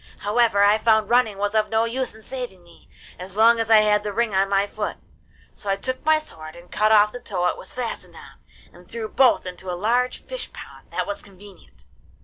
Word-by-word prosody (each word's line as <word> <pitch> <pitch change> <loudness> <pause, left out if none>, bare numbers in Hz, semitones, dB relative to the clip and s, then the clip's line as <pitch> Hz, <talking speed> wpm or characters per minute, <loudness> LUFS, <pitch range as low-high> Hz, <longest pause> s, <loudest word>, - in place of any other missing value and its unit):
However, 210 -1 +2
I 205 +2 +4
found 220 -1 +2
running 240 -5 +3
was 205 +1 -1
of 215 -1 +1
no 225 +1 +2
use 245 0 -3
in 220 - -16
saving 245 -9 -7
me, 170 - -21 0.3
as 185 +2 -8
long 230 +1 +5
as 225 -1 -1
I 220 -1 +7
had 210 -1 +3
the 210 0 -4
ring 225 0 -1
on 195 +1 +2
my 195 0 +2
foot; 210 +1 -5 0.6
so 205 - -8
I 195 - +2
took 255 +6 -4
my 315 0 +4
sword 155 - -9
and 175 +1 -15
cut 215 +1 +2
off 210 -1 +5
the 245 - -7
toe 185 -7 -3
it - - +1
was - - -8
fastened 245 -3 -6
on, - - -14 0.3
and 175 0 -18
threw 225 -1 -5
both 255 -2 +3
into 180 +1 -8
a 175 - -3
large 245 +6 0
fish - - -6
pond - - -12
that - - -2
was 305 0 -5
convenient. 200 0 -17
215 Hz, 225 wpm, -23 LUFS, 195-235 Hz, 0.6 s, I